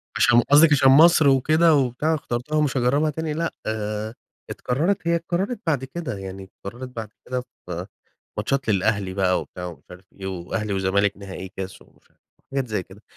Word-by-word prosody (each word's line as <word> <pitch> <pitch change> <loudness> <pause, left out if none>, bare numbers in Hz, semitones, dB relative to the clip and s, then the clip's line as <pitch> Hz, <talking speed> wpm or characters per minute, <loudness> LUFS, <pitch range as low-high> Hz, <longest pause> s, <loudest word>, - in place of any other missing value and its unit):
عشان 120 0 +5
قصدك 150 +5 +6
عشان 135 -2 +6
مصر 160 +1 +7
وكده 155 +5 +4
وبتاع 135 +3 +1
اخترتها 140 0 -3
ومش 150 -3 +1
هاجربها 140 +5 +2
تاني، 155 +1 -3
لأ، 165 +2 -2
آآ 110 0 -3 0.4
اتكررت 165 +8 -1
هي 170 - +3
اتكررت 175 +7 -2
بعد 140 -5 +1
كده، 135 -5 -5
يعني 95 0 -7
اتكررت 120 +7 -9
بعد 110 -2 -5 0.2
كده 125 0 -2 0.2
في 90 0 -5 0.5
ماتشات 135 -4 -1
للأهلي 100 -1 +1
بقى 95 -2 +2
وبتاع 90 - -8
ومش 85 - -9
عارف 90 +1 -12
إيه، 95 - -8
وأهلي 95 +3 -3
وزمالك 100 +1 +1
نهائي 95 -2 -8
كاس 95 -1 -6
ومش - - -27
عارف - - -37 0.3
حاجات 135 -2 -1
زي 105 -3 -1
كده، 100 +4 -16
120 Hz, 175 wpm, -23 LUFS, 100-150 Hz, 0.5 s, مصر